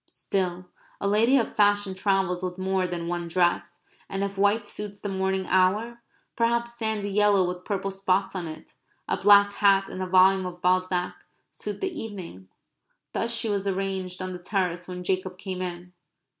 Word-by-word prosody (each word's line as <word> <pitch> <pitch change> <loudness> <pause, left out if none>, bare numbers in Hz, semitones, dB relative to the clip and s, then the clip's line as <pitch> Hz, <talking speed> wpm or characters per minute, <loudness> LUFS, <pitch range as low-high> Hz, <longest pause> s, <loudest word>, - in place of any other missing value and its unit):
Still, 185 -2 -3 0.3
a 200 - -1
lady 225 +6 +4
of 235 - -1
fashion 205 -1 +3
travels 190 -2 0
with 180 -1 -4
more 190 0 0
than 170 -1 -4
one 175 0 -3
dress, 175 0 0 0.3
and 195 0 -2
if 200 0 -3
white 205 +2 +2
suits 205 -1 -6
the 205 - -4
morning 190 0 -1
hour, 210 +7 +1 0.3
perhaps 235 0 +1
sandy 220 -3 -2
yellow 200 -2 +4
with 180 0 -5
purple 195 -1 -2
spots 195 0 0
on 175 -3 -3
it, 155 0 -10 0.3
a - - +1
black 205 0 +6
hat, 195 -1 +3
and 185 - -6
a 185 - -2
volume 185 0 +5
of 175 -1 -8
Balzac, 180 0 0 0.3
suit - - -6
the 380 -3 -3
evening. 185 - -8 0.7
Thus 230 - 0
she 230 -1 +1
was 200 -2 -1
arranged 190 -1 -2
on 185 0 -4
the 180 - -7
terrace 180 -2 -2
when 180 -1 -6
Jacob 185 0 -2
came 185 0 -5
in. 180 0 -6
190 Hz, 175 wpm, -26 LUFS, 180-205 Hz, 0.7 s, black